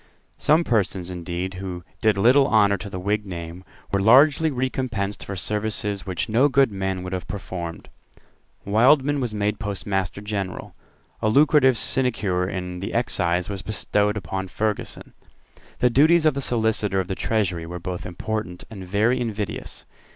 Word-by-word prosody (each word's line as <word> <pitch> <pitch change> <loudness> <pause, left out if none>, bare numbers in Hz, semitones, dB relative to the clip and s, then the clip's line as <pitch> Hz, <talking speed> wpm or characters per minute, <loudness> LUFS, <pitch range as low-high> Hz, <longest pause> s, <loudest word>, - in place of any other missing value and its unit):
Some 155 +3 +4
persons, 95 - -1
indeed, 90 +1 -4
who 90 -2 -6 0.2
did 110 -3 +3
little 130 +7 +5
honour 105 -4 +4
to 100 +2 -7
the 95 - -5
Whig 105 +3 -1
name, 85 -2 -7 0.3
were 100 0 +1
largely 145 - +5
recompensed 125 -6 -2
for 100 - -6
services 105 0 -2
which 90 -2 -2
no 120 +6 +3
good 135 -3 +3
man 95 -2 -3
would 90 +1 -5
have 90 -2 -4
performed. 85 -4 -6 0.8
Wildman 135 +7 +4
was 125 -4 -2
made 105 0 -1
Postmaster 100 -2 -2
General. 100 -2 -5 0.5
A 110 - +2
lucrative 140 0 +5
sinecure 100 -10 0
in 90 -2 -5
the 95 - -5
Excise 90 -6 +1
was 100 -2 -4
bestowed 105 +1 0
on 95 +1 -3
Ferguson. 105 +3 -3 0.6
The 125 - +2
duties 155 +6 +5
of 155 - +4
the 140 - -3
Solicitor 110 -5 +1
of 95 - -2
the 95 - -2
Treasury 95 -6 -1
were 90 +1 -6
both 90 +1 -5
very - - -7
important 90 0 -4
and 100 -4 -8
very 105 +7 +1
invidious. 105 -4 -5
105 Hz, 160 wpm, -23 LUFS, 95-120 Hz, 0.8 s, little